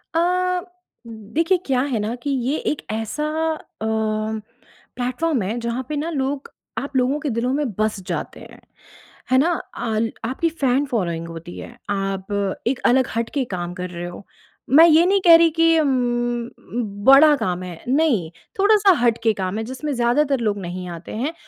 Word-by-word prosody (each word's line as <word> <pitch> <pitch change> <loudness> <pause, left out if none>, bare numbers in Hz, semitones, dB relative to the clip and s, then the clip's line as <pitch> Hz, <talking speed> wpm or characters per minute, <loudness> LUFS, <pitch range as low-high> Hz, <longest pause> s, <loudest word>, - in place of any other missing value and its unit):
अ, 360 +1 +1 0.5
देखिए 230 - 0
क्या 260 -2 +1
है 260 -5 -1
ना 215 +2 -2
कि 285 - -2
ये 270 +2 0
एक 300 - -4
ऐसा 225 +7 -3 0.3
अ, 310 - -7 1.4
प्लेटफ़ॉर्म 255 +3 -1
है 205 +5 -2
जहाँ 235 +2 -3
पे 305 - -2
ना 300 +3 -2
लोग 275 -2 -3 0.3
आप 280 0 -4
लोगों 260 +3 +1
के 300 -1 -3
दिलों 235 +1 -1
में 295 +1 0
बस 215 -1 0
जाते - - -4
हैं, - - -14 0.7
है 260 - +5
ना? 295 +6 +4 0.3
आल 225 0 -1
आपकी 265 +8 0
फैन 280 -4 +1
फ़ॉलोइंग 175 -10 -2
होती 165 +1 -9
है, - - -10
आप 195 -1 -2 0.4
एक 250 +1 0
अलग 260 +1 +4
हट 230 0 -1
के 280 - +1
काम 175 0 -4
कर 180 0 -5
रहे 175 0 -6
हो। 175 +3 -10 0.5
मैं 325 - +10
ये 325 +1 +6
नहीं 390 +2 +3
कह 335 -1 +10
रही 335 0 +5
कि 330 0 +4
उम 300 -3 +2
उम, 240 -4 -2
बड़ा 290 +3 +8
काम 185 -6 -2
है, 175 -2 -9
नहीं, 260 - +2 0.3
थोड़ा-सा 410 -1 +5
हट 235 -1 +3
के 225 -1 +3
काम 190 0 -3
है 225 - -2
जिसमें 260 +5 -4
ज़्यादातर 265 +3 +2
लोग 210 -3 0
नहीं 180 0 -5
आते 170 0 -8
हैं। 280 +8 -2
250 Hz, 180 wpm, -21 LUFS, 215-300 Hz, 1.4 s, मैं